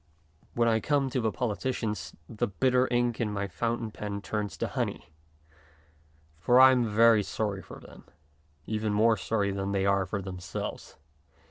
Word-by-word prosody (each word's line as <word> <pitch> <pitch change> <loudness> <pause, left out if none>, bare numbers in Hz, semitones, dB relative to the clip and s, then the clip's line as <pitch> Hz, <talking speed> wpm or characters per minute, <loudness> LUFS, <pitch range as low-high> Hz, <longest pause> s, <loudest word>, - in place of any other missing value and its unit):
When 120 0 +2
I 110 -1 +3
come 140 0 0
to 130 -1 0
the 110 -1 0
politicians 110 -7 -3
the 110 - -2
bitter 125 +5 +2
ink 120 -1 0
in 110 -2 -1
my 100 -1 -2
fountain 115 +5 -3
pen 105 -1 -5
turns 105 -2 -3
to - - -2
honey, 85 - -4 1.3
for 120 +8 +4
I 130 0 +9
am 125 -2 +2
very 110 0 +5
sorry 100 -1 -3
for - - -12
them, - - -15 0.6
even 110 -1 -2
more 110 +2 +4
sorry 100 0 -1
than 100 0 -3
they 95 -1 +1
are 100 -1 +2
for 100 +2 -3
themselves. 90 -1 -6
110 Hz, 160 wpm, -28 LUFS, 100-120 Hz, 1.3 s, I